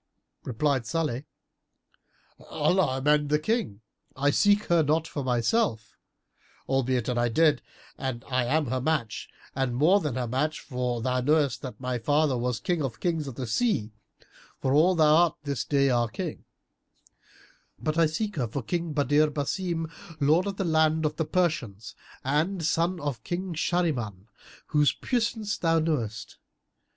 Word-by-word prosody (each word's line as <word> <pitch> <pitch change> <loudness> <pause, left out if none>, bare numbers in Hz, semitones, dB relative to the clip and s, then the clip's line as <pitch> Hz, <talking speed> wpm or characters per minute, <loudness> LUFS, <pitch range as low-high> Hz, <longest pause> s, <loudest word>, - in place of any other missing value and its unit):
Replied 130 0 0
Salih, 150 -5 -2 1.2
"Allah 180 -8 +1
amend 150 +2 +2
the 150 - +3
King! 155 - -2 0.3
I 145 +2 +2
seek 205 +5 +3
her 170 -1 +3
not 155 +2 +1
for 145 - -4
myself 120 - 0 0.7
(albeit, 130 -3 0
an 125 -1 0
I 120 0 +2
did, 155 +5 +3 0.4
I 130 -1 -2
am 150 +5 +1
her 130 0 -2
match 140 -6 -2 0.3
and 130 -2 -1
more 165 +10 +4
than 150 -9 -3
her 125 -2 -2
match, 150 +6 -1
for 125 -3 -3
thou 125 0 0
knowest 145 -1 +2
that 130 - -7
my 125 -1 -2
father 145 +3 +2
was 125 -1 -1
King 175 -3 -1
of 135 -5 -2
the - - -22
Kings 165 -5 -1
of 135 - -7
the 130 - -4
sea, 115 - 0 0.7
for 130 - 0
all 170 +6 +4
thou 155 -2 +5
art 170 -2 +3
this 140 -4 -2
day 140 -2 +2
our 120 -1 +2
King), - - -6 1.3
but 155 - -2
I 165 -1 +4
seek 205 +5 -3
her 125 -4 0
for 125 +4 -4
King 170 +2 -2
Badr 145 +1 +3
Basim, 165 +3 -2 0.3
lord 160 +6 +3
of 200 -1 -4
the - - -1
lands 160 -1 +2
of 150 0 -1
the 160 - 0
Persians 145 - -1 0.3
and 160 +6 0
son 170 +3 +1
of 145 -5 -4
King 180 +1 -3
Shahriman, 130 - -1 0.4
whose 150 -2 +3
puissance 225 -4 -2
thou 165 -1 +2
knowest. 120 -10 -2
150 Hz, 160 wpm, -27 LUFS, 125-165 Hz, 1.3 s, thou